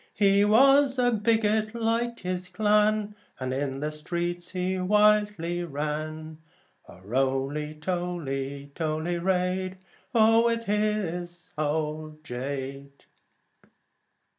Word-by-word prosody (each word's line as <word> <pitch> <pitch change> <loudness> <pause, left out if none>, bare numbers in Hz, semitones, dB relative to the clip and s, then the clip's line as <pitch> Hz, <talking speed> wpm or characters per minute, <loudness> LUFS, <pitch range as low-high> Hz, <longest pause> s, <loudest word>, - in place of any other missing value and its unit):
He 200 0 +4
was 270 +5 +5
a 245 -1 +3
bigot, 220 0 +1
like 235 +1 -1
his 180 0 -4
clan, 210 +1 +2 0.3
And 130 0 -2
in 135 0 -2
the 150 +1 -2
streets 175 +3 -3
he 185 0 -2
wildly 205 -3 +2
sang, 155 +2 -4 0.5
O - - -13
Roly, 135 +7 -1
toly, 150 -5 -4
toly 160 +2 -2
raid, 185 +1 0 0.3
with 230 0 +4
his 195 -5 -2
old 155 0 -3
jade. 140 +1 -6
175 Hz, 95 wpm, -27 LUFS, 150-210 Hz, 0.5 s, was